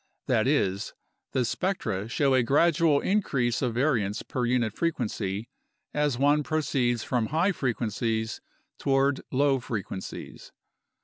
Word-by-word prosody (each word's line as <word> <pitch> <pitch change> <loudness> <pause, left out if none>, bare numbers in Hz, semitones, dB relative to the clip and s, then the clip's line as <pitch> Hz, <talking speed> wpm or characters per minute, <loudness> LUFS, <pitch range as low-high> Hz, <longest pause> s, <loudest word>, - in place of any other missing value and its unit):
That - - +2
is, 95 +1 0 0.4
the 130 -2 +1
spectra 115 - -2
show 135 +2 +2
a 130 - +5
gradual 150 +3 +3
in 210 +2 +2
crease 120 - 0
of 120 -4 -1
variance 115 -7 +1
per 125 -1 -2
unit 120 -3 +1
frequency 110 - -2 0.5
as 150 -4 +1
one 145 +3 +3
proceeds 135 -6 0
from 120 -4 0
high 165 +7 +2
fre 135 -8 -1
quencies 110 -1 -2 0.4
toward 135 0 +2
low 140 0 +3
frequencies. 105 -5 -6
130 Hz, 130 wpm, -27 LUFS, 115-145 Hz, 0.5 s, a